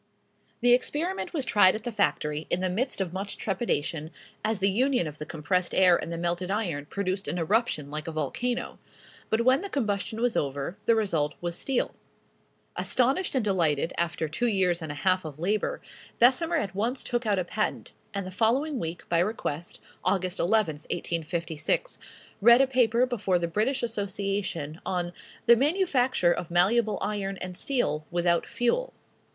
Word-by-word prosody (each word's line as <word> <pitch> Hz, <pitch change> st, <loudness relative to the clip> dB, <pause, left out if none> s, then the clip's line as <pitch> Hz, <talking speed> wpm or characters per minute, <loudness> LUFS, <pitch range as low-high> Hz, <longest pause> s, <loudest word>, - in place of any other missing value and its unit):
The 245 Hz, 0 st, +6 dB
experiment 315 Hz, +9 st, 0 dB
was 290 Hz, -7 st, -2 dB
tried 205 Hz, -6 st, +5 dB
at 215 Hz, -, -5 dB
the 240 Hz, -, -3 dB
factory, 155 Hz, -7 st, 0 dB
in 175 Hz, -, +1 dB
the 185 Hz, -1 st, 0 dB
midst 230 Hz, +2 st, -1 dB
of 180 Hz, -2 st, -3 dB
much 195 Hz, +2 st, -4 dB
trepidation, 165 Hz, -7 st, -2 dB, 0.3 s
as 220 Hz, 0 st, 0 dB
the 195 Hz, +1 st, +2 dB
union 250 Hz, -1 st, +2 dB
of 150 Hz, -1 st, -7 dB
the 150 Hz, -, -6 dB
compressed 175 Hz, +3 st, -1 dB
air 185 Hz, -2 st, +6 dB
and 170 Hz, -, -3 dB
the 170 Hz, -, -3 dB
melted 175 Hz, +2 st, -2 dB
iron 175 Hz, -9 st, -2 dB
produced 195 Hz, +1 st, -2 dB
an 175 Hz, -, -2 dB
eruption 170 Hz, -5 st, 0 dB
like 155 Hz, +1 st, -5 dB
a -, -, -2 dB
volcano; 160 Hz, -, -2 dB, 0.5 s
but 220 Hz, -, +2 dB
when 260 Hz, +4 st, +5 dB
the 400 Hz, -, -5 dB
combustion 220 Hz, -, -2 dB
was 245 Hz, 0 st, +1 dB
over, 140 Hz, +4 st, -2 dB
the 230 Hz, -, +6 dB
result 165 Hz, -9 st, 0 dB
was 175 Hz, -1 st, -3 dB
steel. 265 Hz, +6 st, -1 dB, 0.8 s
Astonished 270 Hz, +8 st, +1 dB
and 250 Hz, -5 st, +1 dB
delighted, 165 Hz, -6 st, +1 dB
after 170 Hz, -1 st, -1 dB
two 235 Hz, +11 st, -1 dB
years 185 Hz, -5 st, +2 dB
and 155 Hz, -2 st, -4 dB
a -, -, -6 dB
half 185 Hz, 0 st, +3 dB
of 150 Hz, -3 st, -7 dB
labor, 200 Hz, +6 st, -1 dB, 0.4 s
Bessemer 295 Hz, +8 st, +4 dB
at 200 Hz, -, -2 dB
once 230 Hz, +7 st, -1 dB
took 240 Hz, -2 st, -2 dB
out 205 Hz, -2 st, +2 dB
a 185 Hz, -, +1 dB
patent; 210 Hz, +4 st, -2 dB, 0.2 s
and 200 Hz, -2 st, -3 dB
the 185 Hz, -, -6 dB
following 250 Hz, +8 st, +1 dB
week, 165 Hz, +1 st, -5 dB
by 170 Hz, -, +2 dB
request, 175 Hz, -4 st, -2 dB, 0.2 s
Aug. 190 Hz, -2 st, +2 dB, 0.2 s
11, 185 Hz, -5 st, +2 dB
1856, 165 Hz, -, -2 dB, 0.4 s
read 235 Hz, +3 st, +8 dB
a 270 Hz, -, +6 dB
paper 250 Hz, -2 st, +3 dB
before 205 Hz, -7 st, 0 dB
the 170 Hz, -1 st, -1 dB
British 230 Hz, +10 st, 0 dB
Association, 200 Hz, -7 st, -2 dB
on 175 Hz, -1 st, -2 dB, 0.3 s
"The 235 Hz, 0 st, +8 dB
manufacture 265 Hz, -, +2 dB
of 175 Hz, -, -5 dB
malleable 205 Hz, +5 st, +3 dB
iron 195 Hz, -2 st, -2 dB
and 185 Hz, -1 st, -6 dB
steel 210 Hz, -, -1 dB
without 175 Hz, -1 st, +1 dB
fuel." -, -, 0 dB
195 Hz, 170 wpm, -27 LUFS, 170-240 Hz, 0.8 s, read